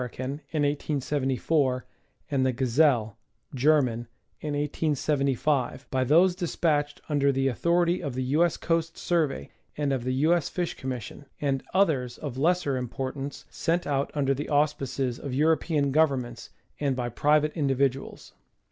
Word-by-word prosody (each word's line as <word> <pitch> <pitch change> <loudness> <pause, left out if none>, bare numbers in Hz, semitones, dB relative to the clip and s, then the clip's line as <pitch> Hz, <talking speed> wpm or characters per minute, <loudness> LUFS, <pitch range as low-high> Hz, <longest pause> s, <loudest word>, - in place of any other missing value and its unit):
in 125 - -2 0.4
1874, 145 -2 0 0.5
and 135 -2 +2
the 130 - +2
Gazelle 125 -3 +2 0.3
(Ger.) 145 +4 +4
in 125 -5 0 0.4
1875, 145 -2 0
by 130 -1 +1
those 170 +8 +5
despatched 155 -5 0
under 140 -2 +2
the 135 0 +1
authority 170 +7 +1
of 140 -7 -4
the 130 - -1
U. 145 +6 +2
S. 175 - +1
Coast 165 0 -1
Survey 160 -6 -1 0.3
and 145 -2 0
of 130 -3 -2
the 130 +1 -1
U. 155 +6 +3
S. 170 -5 0
Fish 175 -2 -2
Commission, 130 +2 -6
and 135 -2 0
others 150 -11 +1
of 140 -5 -6
lesser 160 -3 +2
importance, 135 +3 -5
sent 175 +1 0
out 140 -1 0
under 135 -2 +2
the 145 +2 -5
auspices 140 -4 0
of 135 -3 -5
European 155 -1 +2
governments, 135 -6 0 0.3
and 140 -3 0
by 125 -1 -2
private 150 +5 +2
individuals. 135 -3 -1
140 Hz, 140 wpm, -27 LUFS, 130-155 Hz, 0.5 s, those